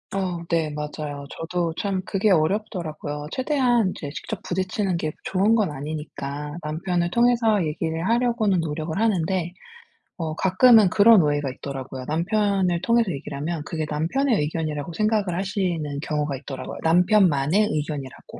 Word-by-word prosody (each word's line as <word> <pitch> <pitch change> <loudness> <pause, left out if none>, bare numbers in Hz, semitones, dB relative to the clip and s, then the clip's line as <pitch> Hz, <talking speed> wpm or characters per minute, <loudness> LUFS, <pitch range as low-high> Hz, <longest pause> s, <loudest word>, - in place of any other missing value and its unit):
어. 185 -3 -2
네 165 -2 +1
맞아요. 150 -1 -5
저도 170 0 -2
참 195 -2 -1
그게 200 +2 +1
어렵더라고요. 160 -4 -1
최대한 255 -7 +2
이제 145 - -6
직접 185 +7 -6
부딪히는 185 +1 -1
게 155 -2 -3
좋은 200 +4 +2
건 210 -8 +1
아니니까 145 0 -6
남편을 170 +3 -1
통해서 235 -5 +3
얘기를 160 +2 -2
하려고는 230 -5 +2
노력을 160 +2 -3
하는데 185 -5 0 0.6
어 160 -3 -3
가끔은 205 +3 +5
그런 215 -2 +7
오해가 145 -2 0
있더라고요. 130 -1 -7
남편을 185 +1 +1
통해서 230 -4 +2
얘기를 140 -1 -6
하면 160 +1 -3
그게 160 -1 -3
남편의 210 - +1
의견이라고 155 0 -3
생각을 210 -3 0
하시는 185 -3 -1 0.2
경우가 150 -2 -2
있더라고요. 130 -1 -7
남편만의 180 0 +3
의견이라고. 150 -3 -5
170 Hz, 365 characters per minute, -24 LUFS, 150-205 Hz, 0.6 s, 그런